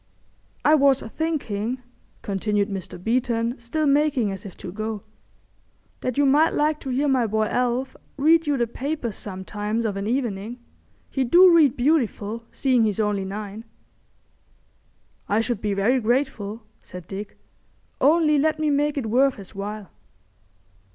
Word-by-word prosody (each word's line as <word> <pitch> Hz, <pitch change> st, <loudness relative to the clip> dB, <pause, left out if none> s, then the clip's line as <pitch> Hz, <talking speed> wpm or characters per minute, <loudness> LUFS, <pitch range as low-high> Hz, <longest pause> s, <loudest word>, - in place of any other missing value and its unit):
"I 305 Hz, -, +6 dB
was 280 Hz, -3 st, +4 dB
thinking," 250 Hz, -5 st, -3 dB, 0.4 s
continued 205 Hz, +1 st, 0 dB
Mr. 190 Hz, -1 st, -6 dB
Beeton, 235 Hz, +4 st, -1 dB
still 300 Hz, +7 st, -2 dB
making 280 Hz, -6 st, +2 dB
as 195 Hz, +1 st, -7 dB
if 185 Hz, -, -12 dB
to 180 Hz, -, -7 dB
go, 215 Hz, +1 st, -4 dB, 1.0 s
"that 255 Hz, 0 st, -3 dB
you 285 Hz, -, +4 dB
might 295 Hz, +4 st, +4 dB
like 300 Hz, 0 st, +1 dB
to 270 Hz, -, -7 dB
hear 270 Hz, +3 st, +1 dB
my 260 Hz, -4 st, +2 dB
boy 220 Hz, +1 st, +1 dB
Alf 250 Hz, +3 st, -1 dB, 0.2 s
read 320 Hz, +3 st, +4 dB
you 290 Hz, -1 st, +2 dB
the 240 Hz, -, +2 dB
papers 255 Hz, -1 st, -4 dB
sometimes 210 Hz, +3 st, -4 dB
of 205 Hz, -3 st, -1 dB
an 200 Hz, +1 st, -3 dB
evening. 235 Hz, -2 st, -2 dB, 0.5 s
He 270 Hz, -, 0 dB
do 350 Hz, +7 st, +7 dB
read 295 Hz, -6 st, +4 dB
beautiful, 235 Hz, -5 st, 0 dB
seeing 255 Hz, -4 st, +2 dB
he's 210 Hz, -1 st, -1 dB
only 205 Hz, -2 st, 0 dB
nine." 205 Hz, +2 st, -6 dB, 1.7 s
"I 210 Hz, -, +2 dB
should 225 Hz, -2 st, -1 dB
be 205 Hz, -2 st, -1 dB
very 230 Hz, +7 st, +2 dB
grateful," 230 Hz, -3 st, -1 dB, 0.2 s
said 180 Hz, -2 st, -9 dB
Dick. 200 Hz, +1 st, -7 dB, 0.6 s
"Only 300 Hz, +1 st, +4 dB
let 310 Hz, +2 st, +2 dB
me 310 Hz, -1 st, +1 dB
make 290 Hz, +1 st, +1 dB
it 265 Hz, -, -1 dB
worth 255 Hz, +4 st, +3 dB
his 195 Hz, -3 st, -12 dB
while." 200 Hz, -2 st, -6 dB
235 Hz, 150 wpm, -24 LUFS, 210-280 Hz, 1.7 s, do